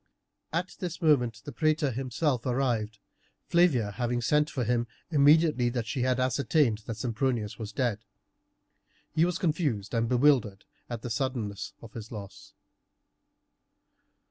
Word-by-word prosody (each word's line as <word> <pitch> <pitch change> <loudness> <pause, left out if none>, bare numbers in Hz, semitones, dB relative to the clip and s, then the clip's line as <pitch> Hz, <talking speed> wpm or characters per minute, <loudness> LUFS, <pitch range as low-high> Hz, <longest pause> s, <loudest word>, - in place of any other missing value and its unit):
At 175 +3 -3
this 180 -3 -4
moment 125 -9 +2
the 145 - -6
praetor 155 0 +1
himself 130 +1 -1
arrived, 120 -5 0 0.5
Flavia 145 -12 +3
having 120 +2 -1
sent 150 +5 +2
for 135 -3 -2
him 120 +1 0 0.2
immediately 150 -4 +4
she 115 +4 -3
had 130 0 +1
ascertained 130 -1 +2
that 115 -3 -4
Sempronius 115 -1 -2
was 110 -2 -5
dead. 115 -2 -1 1.1
He 160 - +4
was 180 0 -1
confused 150 - -1
and 115 -1 +1
bewildered 125 -6 +3 0.2
at 120 -2 -5
the 120 - -4
suddenness 115 -5 -3
of 115 - -11
his 110 -1 -8
loss. 100 -4 -10
125 Hz, 130 wpm, -28 LUFS, 115-150 Hz, 1.1 s, immediately